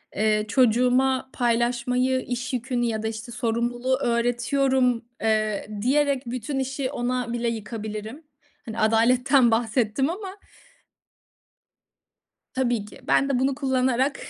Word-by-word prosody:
eee, 215 0 +1
"Çocuğuma 255 +2 +2
paylaşmayı, 250 +2 +1
iş 245 +1 -4
yükünü 245 0 -1
ya 220 -2 -2
da, 220 - -1
işte, 220 +2 -6
sorumluluğu 240 +2 -1
öğretiyorum." 245 +1 +1 0.2
eee, 215 -2 0
diyerek, 275 +2 +2
bütün 255 +3 -3
işi 265 0 -2
ona 245 -1 -2
bile 235 0 -1
yıkabilirim. 220 +4 -6 0.4
Hani, 225 -1 -6
adaletten 245 +3 +4
bahsettim 230 +3 +1
ama. 385 +2 -6 2.1
Tabii 240 -5 0
ki. 210 - -13
Ben 275 - +3
de 265 -3 +1
bunu 265 +1 +1
kullanarak 265 0 +1
245 Hz, 115 wpm, -24 LUFS, 230-260 Hz, 2.1 s, adaletten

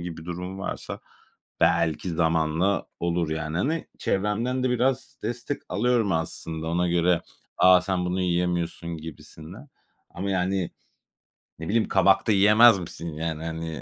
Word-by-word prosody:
gibi 85 -2 -7
durum 90 +2 -6
varsa 95 - -5 0.6
belki 85 +1 +2
zamanla 80 +3 +1
olur 85 -2 0
yani 80 0 -3
hani, 155 - -1
çevremden 110 +6 -1
de 130 - +2
biraz 125 +2 0
destek 120 +5 -4
alıyorum 115 -3 +1
aslında 80 0 -3
ona 90 +1 +1
göre, 85 0 +2 0.3
"A, 90 0 +7
sen 90 -1 -1
bunu 90 +1 -1
yiyemiyorsun," 85 -1 -1
gibisinden 80 - -11 0.4
ama 100 +2 -4
yani, 95 -1 0 0.9
ne 80 - -6
bileyim, 110 +1 +2
"Kabak 95 0 +3
da 110 - +4
yiyemez 105 +2 +6
misin?" 85 -1 -6
yani 80 0 -4
hani, 80 -1 -5
90 Hz, 135 wpm, -25 LUFS, 80-100 Hz, 0.9 s, A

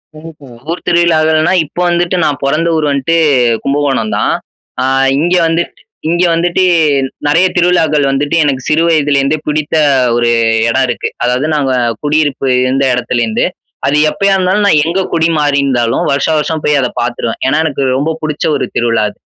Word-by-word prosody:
ம்ஹம். 150 -6 -13
ஊர் 175 - -5
திருவிழாக்கள்னா 160 -1 +2
இப்போ 175 +4 -6
வந்துட்டு 175 +1 0
நான் 145 -2 -1
பொறந்த 155 +5 0
ஊர் 155 - 0
வந்துட்டு 140 +4 0 0.5
கும்பகோணம் 140 -5 -1
தான். - - 0 0.5
அ - - 0 0.4
இங்க 175 +4 +1
வந்துட்டு 165 +1 -3 0.3
இங்க 175 +2 +1
வந்துட்டு 175 +2 0 0.6
நெறைய 165 +5 +3
திருவிழாக்கள் 170 -4 +2
வந்துட்டு 145 +3 -1
எனக்கு 135 -3 -1
சிறு 155 +2 +2
வயதுலேருந்தே 145 -2 +1
பிடித்த 150 +1 -1 0.4
ஒரு 120 0 +1 0.4
இடம் 130 +3 +1
இருக்கு. 120 - -3 0.2
அதாவது 125 +3 0
நாங்க 140 -3 0 0.3
குடியிருப்பு 145 -2 0 0.2
இருந்த 135 +2 0
இடத்துலேருந்து 120 -2 -1 0.4
அது 145 - +1
எப்பயா 200 +4 0
இருந்தாலும் 190 +2 +1
நான் 155 -6 +4
எங்க 170 +4 -1
குடி 165 -1 +2
மாறி 145 -1 +1
இருந்தாலும் 120 -4 0
வருஷா 140 +3 0
வருஷம் 155 +1 -2
போய் 150 -1 +2
அத 125 - 0
பாத்துருவேன். 120 -1 -3
ஏன்னா, 140 +3 +1
எனக்கு 145 -3 -2 0.2
ரொம்ப 150 +4 -1
புடிச்ச 155 -1 -3
ஒரு - - -1
திருவிழா 115 -2 +1
அது. - - -17
150 Hz, 160 wpm, -12 LUFS, 135-165 Hz, 0.6 s, நான்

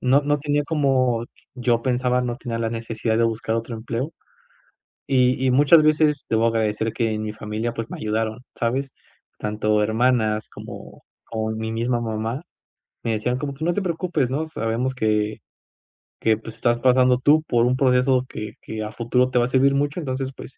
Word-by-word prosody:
no 130 +2 +4
no 145 +1 +1
tenía 145 0 0
como 130 -6 +1 0.3
yo 120 -2 +1
pensaba 125 0 +1
no 120 -1 -2
tenía 120 -3 -4
la 115 -1 -1
necesidad 115 -1 -2
de 115 - +4
buscar 115 0 -1
otro 115 +1 -4
empleo, 120 +7 -4 0.9
y 130 -1 +2
y - - +4
muchas 145 +5 +6
veces 150 -1 +2
debo 110 0 +2
agradecer 110 -1 0
que 115 -2 0
en 110 - -2
mi 105 0 -3
familia, 110 +2 -3
pues, 115 -1 -4
me - - -5
ayudaron, 110 +1 -2 0.2
¿sabes? 130 +4 -1 0.5
Tanto 105 0 0
hermanas 110 -1 +1
como - - -10 0.2
como 110 -1 -3
mi 110 0 -3
misma 120 +2 0
mamá, 115 +4 -3 0.6
me 115 - 0
decían 120 +3 0
como 140 +1 -4
que: 150 +4 -5
"No 175 - +2
te 205 - -1
preocupes, 170 -6 -1
¿no?, 145 +5 -1
sabemos 125 -3 -2
que 110 -2 0 0.8
que, 110 -1 +2
pues, 115 0 -10
estás 120 -1 +1
pasando 125 0 +4
tú 150 +4 +4
por 120 -6 +2
un 125 +1 +2
proceso 130 0 +3
que 105 0 -6
que 110 0 -6
a 105 - -5
futuro 125 +2 +1
te 125 - +2
va - - +3
a - - -1
servir 135 +1 +3
mucho, 145 +4 0
entonces, 130 -3 -3
pues, - - -11
120 Hz, 185 wpm, -23 LUFS, 110-135 Hz, 0.9 s, muchas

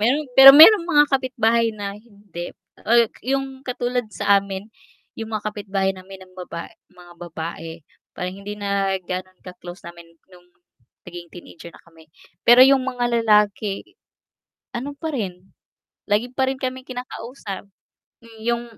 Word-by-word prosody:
Mayroon 270 +8 +1
pero 270 +2 +11
mayroong 340 +2 +9
mga 295 -3 +5
kapitbahay 235 -4 +1
na 200 -1 -5
hindi. 205 -6 -10 0.3
Ay, 235 0 +4 0.2
'yong 270 -1 -4
katulad 245 -1 -2
sa 200 -1 +2
amin, 195 +2 -8 0.5
'yong 225 - -5
mga 215 -1 -3
kapitbahay 195 -2 -2
namin 190 0 -12
ng 185 - -24
baba 170 -2 -7 0.2
mga 180 -1 -17
babae, 165 -1 -8 0.3
parang 180 +1 -4
hindi 205 +1 -7
na 200 -1 -1
ganon 185 +1 -6
ka-close 180 0 -11
namin 170 -1 -13
no'ng 180 -1 -19 0.6
naging 175 -1 -10
teenager 170 -1 -12
na - - -17
kami. 165 -1 -20 0.4
Pero 240 +2 +8
'yong 270 0 +5
mga 245 -2 -1
lalaki, 210 -2 +1 0.9
ano 270 +4 -5
pa 315 0 -4
rin, 190 -6 -6 0.5
lagi 220 +4 0
pa 265 0 0
rin 265 0 -3
kaming 255 0 -5
kinakausap. 245 -5 -8 0.6
Hmm, 230 -1 -17
'yong 235 0 -1
210 Hz, 145 wpm, -21 LUFS, 185-245 Hz, 0.9 s, pero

